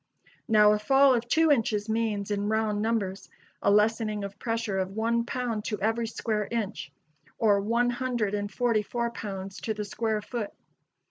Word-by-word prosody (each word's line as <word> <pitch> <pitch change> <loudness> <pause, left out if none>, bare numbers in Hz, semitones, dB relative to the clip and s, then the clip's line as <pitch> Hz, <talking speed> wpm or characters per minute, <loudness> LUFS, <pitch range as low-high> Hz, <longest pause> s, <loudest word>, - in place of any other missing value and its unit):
Now, 210 -3 +6
a 210 - 0
fall 270 +4 +5
of 240 -1 -1
two 320 +4 +4
inches 220 -5 +1
means, 220 -2 -1
in 205 0 -1
round 215 -1 0
numbers, 205 -4 -2 0.3
a - - +2
lessening 210 0 +2
of 200 +1 -7
pressure 225 -4 -1
of 190 +1 -3
one 230 +1 +1
pound 240 -4 -2
to 210 -3 -2
every 225 +2 0
square 215 -2 -2
inch, 215 -10 -3 0.5
or 205 -3 +3
one 235 +4 +1
hundred 240 -4 -1
and 205 0 -2
forty 230 0 +1
four 235 +2 -2
pounds 195 -4 -6
to 220 - -2
the 210 0 -4
square 215 0 -2
foot. 230 -3 -4
220 Hz, 175 wpm, -27 LUFS, 205-235 Hz, 0.5 s, Now